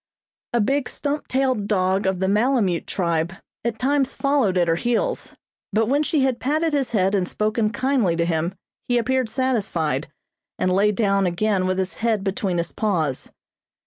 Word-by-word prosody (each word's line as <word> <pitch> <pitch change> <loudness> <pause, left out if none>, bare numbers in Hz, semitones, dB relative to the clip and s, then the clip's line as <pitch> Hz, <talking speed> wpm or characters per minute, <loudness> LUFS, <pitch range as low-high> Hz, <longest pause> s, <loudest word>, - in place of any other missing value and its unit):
A 240 - +1
big 270 +5 +1
stump 290 0 -3
tailed 255 -6 0
dog 190 -1 +1
of 190 -1 +1
the 190 +1 0
Malemute 210 -4 +1
tribe 170 -1 -1 0.3
at 235 -1 -2
times 275 +1 +1
followed 275 -10 +1
at 175 -1 +3
her 165 - +3
heels, 245 - -1 0.4
but 220 +2 +2
when 280 +4 +2
she 305 -1 +1
had 260 -2 +1
patted 310 +4 0
his 275 -3 +1
head 195 -3 +1
and 190 -3 +1
spoken 215 +1 0
kindly 250 -7 +1
to 170 0 +1
him 170 +2 -1 0.3
he 245 - +2
appeared 255 0 +1
satisfied, 195 - -1 0.5
and 185 - +1
lay 205 +3 +3
down 200 -2 +1
again 185 +1 0
with 185 0 0
his 190 0 -1
head 220 -3 +1
between 195 -2 -1
his 170 - -1
paws. 165 - -1
210 Hz, 175 wpm, -22 LUFS, 185-255 Hz, 0.5 s, at